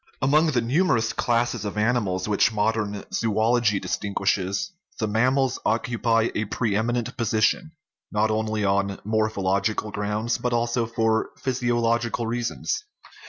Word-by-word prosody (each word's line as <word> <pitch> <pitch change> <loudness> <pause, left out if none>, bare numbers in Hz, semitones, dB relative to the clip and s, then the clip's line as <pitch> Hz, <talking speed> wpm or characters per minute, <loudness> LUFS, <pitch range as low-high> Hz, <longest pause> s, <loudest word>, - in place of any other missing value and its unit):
Among 150 +5 +3
the 130 -6 +1
numerous 120 -3 +1
classes 120 -1 0
of 105 0 -4
animals 105 -5 0
which 105 +2 +3
modern 105 -1 -1
zoology 110 -1 +2
distinguishes 100 - -1 0.3
the 110 - -1
mammals 130 +4 +1
occupy 115 0 +1
a 105 - -1
pre 110 0 -1
eminent 120 +2 -1
position, 115 - +1 0.4
not 110 +1 +1
only 110 -1 -1
on 100 0 0
morphological 105 -1 0
grounds, 105 +3 -1
but 125 -1 -1
also 120 0 0
for 115 -1 +1
physiological 120 -2 0
reasons. 120 - -2
115 Hz, 120 wpm, -24 LUFS, 105-120 Hz, 0.4 s, Among